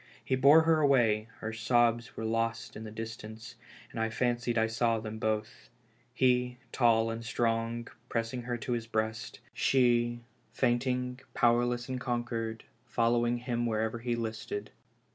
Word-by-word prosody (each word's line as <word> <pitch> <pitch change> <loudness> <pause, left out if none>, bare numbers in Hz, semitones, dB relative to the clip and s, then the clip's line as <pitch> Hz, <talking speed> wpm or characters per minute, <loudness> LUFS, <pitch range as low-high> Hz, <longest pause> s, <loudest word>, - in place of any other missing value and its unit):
He 130 - +1
bore 140 +5 +7
her 160 -1 +4
away, 120 -7 +3
her 110 0 -4
sobs 120 +2 +1
were 110 - -3
lost 115 +1 -1
in 110 - -7
the - - -6
distance, 110 +1 -8 0.4
and - - -6
I 110 0 +1
fancied 120 0 0
I 110 - +4
saw 115 0 +1
them 110 0 -6
both 110 0 -2 0.2
— 120 +2 -37
he, 125 -1 +2
tall 115 -2 +3
and 115 +1 -5
strong, 115 0 -1 0.2
pressing 115 +2 -2
her 120 0 -3
to 120 - -5
his 115 -1 -2
breast; 110 0 -3
she, 120 -2 +2 0.3
fainting, 125 +1 0 0.2
powerless 120 0 +2
and 130 -1 -4
conquered, 120 -3 -3 0.2
following 120 0 +2
him 120 -1 -2
wherever 110 +1 -1
he 120 0 -1
listed. 110 -2 -4
120 Hz, 150 wpm, -30 LUFS, 115-120 Hz, 0.4 s, bore